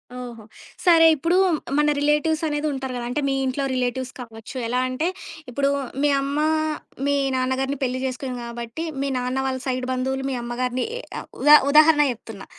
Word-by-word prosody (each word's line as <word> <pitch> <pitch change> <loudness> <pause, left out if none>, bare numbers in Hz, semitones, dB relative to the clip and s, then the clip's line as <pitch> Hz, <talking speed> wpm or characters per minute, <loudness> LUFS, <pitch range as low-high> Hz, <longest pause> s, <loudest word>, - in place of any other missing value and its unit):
ఓహో! 240 -3 -8 0.4
సరే 335 -2 +7
ఇప్పుడు 335 +5 0 0.4
మన 295 0 +3
రిలేటివ్స్ 300 +2 +1
అనేది 295 0 -1
ఉంటారు 265 -1 -4
గదా! 240 - -4
అంటే 290 +4 -1
మీ - - +1
ఇంట్లో 265 +2 -1
రిలేటివ్స్ 255 0 -2
కావచ్చు. 225 0 -10
ఎలా 250 +2 0
అంటే 255 +6 -1 0.4
ఇప్పుడు 275 +3 0 0.3
మీ 295 - +3
అమ్మ, 280 +2 -2 0.7
మీ 285 - +2 0.2
నాన్నగారిని 260 +2 -1
పెళ్లి 255 0 -1
జేసుకోని 260 0 -4
కాబట్టి, 235 +5 -6 0.2
మీ 280 - 0
నాన్న 250 +1 -2
వాళ్ళ 260 -1 -1
సైడ్ 255 -1 -1
బంధువులు 265 +1 -1
మీ 265 - -2
అమ్మగారిని 245 +1 -2
ఏ - - -5 0.4
ఉదా 295 +2 +9
ఉదాహరణ 300 +1 +6
చెప్తున్నా. 225 -4 -9
260 Hz, 160 wpm, -23 LUFS, 250-290 Hz, 0.7 s, ఉదా